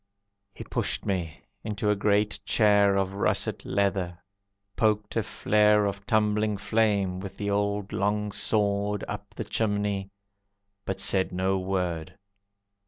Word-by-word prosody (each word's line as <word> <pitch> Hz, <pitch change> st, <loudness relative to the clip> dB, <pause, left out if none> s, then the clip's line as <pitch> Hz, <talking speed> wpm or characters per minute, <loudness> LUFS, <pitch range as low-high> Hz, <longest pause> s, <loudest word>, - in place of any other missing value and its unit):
He -, -, -7 dB
pushed -, -, -2 dB
me 90 Hz, -5 st, -2 dB, 0.2 s
into 105 Hz, -1 st, -1 dB
a -, -, +2 dB
great 105 Hz, +1 st, +1 dB
chair 105 Hz, -2 st, +4 dB
Of 95 Hz, -1 st, 0 dB
russet 100 Hz, -, -1 dB
leather, 95 Hz, -3 st, 0 dB, 0.6 s
poked 105 Hz, -1 st, +1 dB
a 115 Hz, -, +2 dB
flare 105 Hz, 0 st, +3 dB
Of 100 Hz, 0 st, -4 dB
tumbling 105 Hz, -1 st, +2 dB
flame, 100 Hz, -2 st, +1 dB
with 95 Hz, 0 st, -8 dB
the 100 Hz, 0 st, -2 dB
old 100 Hz, 0 st, -1 dB
long 105 Hz, +1 st, 0 dB
sword, 105 Hz, 0 st, 0 dB
Up 100 Hz, 0 st, -7 dB
the -, -, -4 dB
chimney; 105 Hz, -2 st, -1 dB, 0.8 s
but 95 Hz, 0 st, -3 dB
said 95 Hz, -1 st, +2 dB
no 95 Hz, +1 st, 0 dB
word. 90 Hz, -4 st, -2 dB
100 Hz, 130 wpm, -27 LUFS, 95-105 Hz, 0.8 s, chair